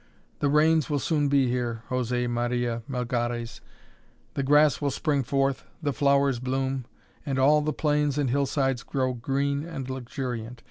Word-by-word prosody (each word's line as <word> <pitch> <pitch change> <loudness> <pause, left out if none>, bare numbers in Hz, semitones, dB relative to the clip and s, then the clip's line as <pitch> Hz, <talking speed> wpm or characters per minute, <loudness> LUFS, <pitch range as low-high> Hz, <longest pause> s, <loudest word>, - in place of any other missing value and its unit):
The 145 - +1
rains 155 +1 +3
will 145 - +1
soon 145 0 +1
be 140 -2 +3
here, 120 -2 -2
José 125 -1 0
Maria 120 0 -1
Melgares, 120 -2 -2 0.7
the - - -1
grass 145 +2 +4
will 145 - +1
spring 140 +1 0
forth, 135 +1 0 0.2
the 145 -4 -1
flowers 140 -2 +2
bloom, 130 0 -2 0.4
and 135 -2 -2
all 145 +3 +5
the 155 +1 0
plains 150 -2 +1
and 140 -4 +1
hillsides 135 -1 +1
grow 130 -2 -1
green 140 +4 -1
and 155 -6 -6
luxuriant. 125 -2 -5
135 Hz, 150 wpm, -26 LUFS, 125-145 Hz, 0.7 s, all